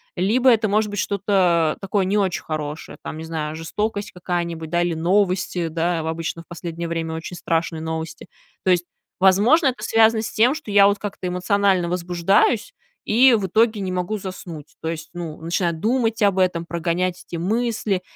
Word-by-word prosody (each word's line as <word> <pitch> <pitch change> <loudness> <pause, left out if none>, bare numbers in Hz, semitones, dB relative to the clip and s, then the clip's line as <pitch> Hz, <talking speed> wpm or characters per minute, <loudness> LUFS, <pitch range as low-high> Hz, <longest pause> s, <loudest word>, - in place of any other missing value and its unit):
либо 230 +8 +3
это 225 -2 +4
может 210 +1 +1
быть 205 -1 -4
что-то 180 -5 +2
такое 195 0 0
не 200 +3 +1
очень 190 -3 0
хорошее, 155 -1 -5
там, 155 - -6
не - - -6
знаю, 155 -1 -4
жестокость 205 +6 -3
какая-нибудь, 170 -3 -4
да, 175 0 +2
или 175 -1 0
новости, 180 0 +1
да. 165 +1 -1
Обычно 165 +1 -3
в - - -20
последнее 170 -1 -6
время 165 -1 -3
очень 160 +2 -6
страшные 165 -1 -1
новости. 160 0 -5 0.4
То 185 - +4
есть, 175 -1 +2 0.4
возможно, 210 - +5
это 250 -4 -1
связано 220 0 +4
с 225 - -3
тем, 240 +6 +3
что 310 -9 -7
я 200 0 +7
вот 205 - +2
как-то 200 -3 -5
эмоционально 185 0 +1
возбуждаюсь, 180 +5 +1 0.3
и 250 +4 +5
в 205 -4 +1
итоге 220 +2 +2
не 185 - -3
могу 185 +4 -2
заснуть. 180 -6 -8
То 160 - -3
есть, 160 -1 -6
ну, 170 -3 -6
начинаю 170 +1 0
думать 225 +4 0
об 200 -2 +3
этом, 180 -2 +1
прогонять 170 +2 -2
эти - - -6
мысли 210 +1 -1
180 Hz, 180 wpm, -22 LUFS, 165-205 Hz, 0.4 s, я